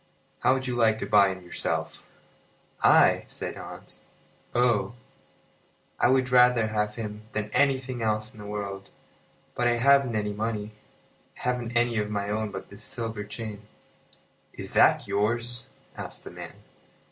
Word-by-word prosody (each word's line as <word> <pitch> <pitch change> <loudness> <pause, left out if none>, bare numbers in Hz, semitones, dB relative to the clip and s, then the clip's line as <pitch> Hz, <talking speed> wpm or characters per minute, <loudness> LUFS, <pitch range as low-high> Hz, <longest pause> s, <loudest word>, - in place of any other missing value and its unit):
"How 130 - +4
would 130 -1 -3
you 125 -1 -2
like 110 -2 +3
to - - -4
buy 100 -2 +5
him 95 -1 -5
yourself?" 90 - -3 0.8
"I!" - - +5
said - - -6
Hans. - - -11 0.6
"Oh! 120 -3 +2 1.0
I - - +5
would 130 -1 +2
rather 125 -3 +5
have 105 0 -1
him 105 -2 -6
than 105 0 -3
anything 130 -3 +1
else 110 0 0
in 110 - -15
the 105 - -8
world; 100 -1 -5 0.6
but 120 - +1
I 120 - +4
haven't 135 0 +4
any 105 -1 -1
money. 105 0 -3 0.7
I - - -12
haven't 120 -1 -1
anything 120 -1 +2
of 105 0 -2
my 100 -1 -2
own 110 0 -1
but 95 -1 -8
this 100 +1 -11
silver 115 -3 -3
chain." 105 0 -8 0.9
"Is - - -7
that - - +5
yours?" 120 +3 -1 0.3
asked - - -8
the - - -9
man. - - -9
110 Hz, 155 wpm, -27 LUFS, 105-120 Hz, 1.0 s, buy